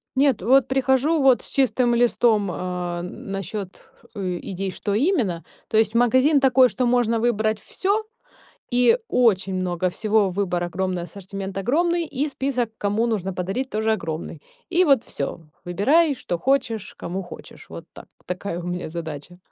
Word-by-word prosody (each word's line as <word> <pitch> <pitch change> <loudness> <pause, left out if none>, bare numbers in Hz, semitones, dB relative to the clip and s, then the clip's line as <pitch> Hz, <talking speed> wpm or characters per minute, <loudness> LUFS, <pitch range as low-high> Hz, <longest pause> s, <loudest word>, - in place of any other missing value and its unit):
Нет, 270 -5 +3
вот 260 +4 +4
прихожу 270 +4 +2
вот 260 -2 +5
с - - -6
чистым 250 -2 +2
листом, 230 -4 +3
а, 180 -1 -4
насчёт, 195 +2 -6 0.3
э, 185 -3 -3
идей, 195 0 -4
что 200 +2 -3
именно. 220 - +1 0.2
То 220 - 0
есть 220 0 +2
магазин 260 +5 +4
такой, 260 -1 +5
что 250 +1 -1
можно 240 -2 +2
выбрать 220 -2 +1
всё 405 +3 -1 0.7
и 250 - +5
очень 195 - +2
много 185 -1 -1
всего: 210 0 +1
выбор 180 -2 -1
огромный, 180 0 -2
ассортимент 195 +1 -7
огромный 335 - +1
и 285 0 -2
список, 265 -4 -2
кому 205 +3 0
нужно 205 -5 -1
подарить, 195 +9 -3
тоже 220 0 0
огромный. 165 -4 -5 0.3
И 360 +1 +3
вот 275 -6 +4
всё. 140 - -4 0.3
Выбирай, 280 - +3
что 175 -7 -4
хочешь, 240 -3 0
кому 185 +3 -4
хочешь. 175 - -12
Вот - - -9
так. - - -12 0.2
Такая 180 -1 -4
у - - -7
меня 180 -1 -4
задача. 160 0 -7
215 Hz, 155 wpm, -23 LUFS, 185-260 Hz, 0.7 s, вот